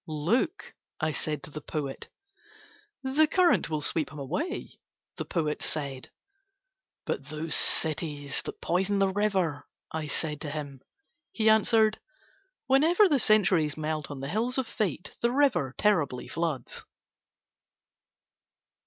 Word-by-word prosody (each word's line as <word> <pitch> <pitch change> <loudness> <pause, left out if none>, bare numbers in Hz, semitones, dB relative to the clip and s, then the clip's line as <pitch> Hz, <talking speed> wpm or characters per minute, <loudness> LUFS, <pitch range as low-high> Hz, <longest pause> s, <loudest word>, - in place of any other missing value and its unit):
"Look," 175 - -1 0.3
I 155 -1 0
said 150 -1 -3
to - - -9
the 150 - -7
poet. 145 -4 -5 0.9
"The 280 +4 +3
current 360 - +3
will 155 -2 -2
sweep 155 +1 0
him 150 - -10
away," 160 - -4 0.4
the - - -4
poet 155 -3 -1
said. 140 -4 -4 1.0
"But 140 - -3
those 155 +2 -3
cities 150 -3 +1
that - - -7
poison 190 +3 +1
the 195 -1 +3
river," 190 -8 0 0.2
I 160 -1 -3
said 150 0 -3
to 150 - -4
him. 145 -3 -6 0.5
He 220 -1 +3
answered: 220 0 +4 0.7
"Whenever 320 - +5
the 290 -6 +2
centuries 190 -10 +3
melt 155 -1 -3
on 140 -2 -6
the 135 - -4
hills 235 - -1
of 260 - +1
Fate 205 - -3
the 235 - +2
river 240 - +2
terribly 155 -12 +1
floods." 160 -7 -3
165 Hz, 130 wpm, -28 LUFS, 150-220 Hz, 1.0 s, Whenever